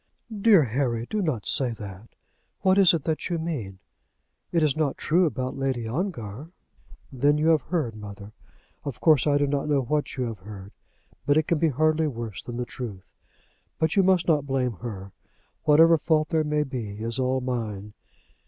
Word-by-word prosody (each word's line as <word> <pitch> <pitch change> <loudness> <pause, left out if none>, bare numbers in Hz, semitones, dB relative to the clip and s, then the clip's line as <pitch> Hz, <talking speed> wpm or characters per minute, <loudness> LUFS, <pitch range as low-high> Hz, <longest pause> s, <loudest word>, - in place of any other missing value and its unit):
"Dear 200 -5 +5
Harry, 120 -1 -1
do 215 - -1
not 145 - -2
say 125 -4 0
that. 100 0 -10 0.5
What 190 +1 +4
is 190 -2 +7
it 160 - -3
that 160 +2 -2
you 175 - 0
mean? 140 - -4 0.7
It 165 -2 +2
is 150 -3 +2
not 155 -3 0
true 175 +3 +2
about 130 -4 -3
Lady 130 -4 -2
Ongar?" 135 - -4 0.6
"Then 140 +3 +2
you 155 +2 +2
have 160 -3 +4
heard, 160 -10 -2
mother. 105 -1 -9 0.5
Of 135 -4 -6
course 155 -4 +4
I 145 -1 +4
do 145 - +2
not 140 +1 -1
know 145 -2 +3
what 145 +2 -2
you 130 - 0
have 115 -4 -5
heard, 100 0 -10 0.6
but 145 +1 +4
it 155 - +4
can 170 - +1
hardly 155 +3 +2
be 140 - -5
worse 115 -4 -5
than 120 -1 -7
the 125 - -2
truth. 110 -8 -7 0.7
But 160 0 0
you 200 - +5
must 185 -2 +3
not 150 -4 +2
blame 130 -3 0
her. 100 -2 -7 0.5
Whatever 165 +2 +6
fault 155 0 +1
there 160 -1 +1
may 150 0 0
be, 110 -6 -6
is 115 +2 -3
all 130 0 +1
mine." 110 -5 -4
135 Hz, 185 wpm, -25 LUFS, 115-155 Hz, 0.7 s, is